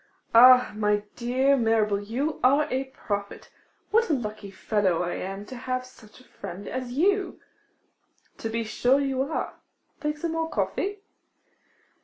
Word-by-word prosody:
'Ah, 250 +2 +8
my 210 -1 +1
dear 260 +3 +2
Mirabel, 225 -4 +2
you 260 +9 -2
are 280 +4 +5
a 260 +1 0
prophet! 205 -6 -5 0.4
What 455 0 +3
a - - +3
lucky 215 -5 -4
fellow 190 -3 0
I 175 - -2
am 195 +2 -5
to 255 - -9
have 255 0 -3
such 225 -4 -17
a - - -18
friend 190 +4 -9
as 255 -1 -4
you!' 390 +7 +1 1.0
'To 225 - -3
be 230 +1 -2
sure 245 +5 +2
you 270 -2 0
are. 280 +4 -3 0.4
Take 300 0 -2
some 330 +2 -3
more 325 0 -2
coffee. 400 +4 -2
250 Hz, 150 wpm, -26 LUFS, 210-280 Hz, 1.0 s, Ah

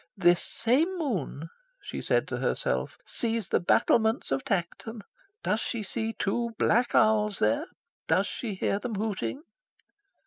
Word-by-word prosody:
"This 175 -2 +4
same 310 +11 +1
moon," 185 - -3 0.3
she - - -6
said - - +1
to - - -2
herself, - - -1
"sees 230 -2 0
the - - +3
battlements 220 - +2
of 135 0 0
Tankerton. 200 +4 -3 0.4
Does 210 - +1
she 225 0 -3
see 225 +2 -2
two 230 +3 -1
black 240 +3 +2
owls 210 -2 +4
there? 110 +1 +1 0.4
Does 195 - +3
she 215 -2 -4
hear 195 +1 0
them 230 -1 -4
hooting?" 220 +7 -3
220 Hz, 140 wpm, -28 LUFS, 195-235 Hz, 0.4 s, This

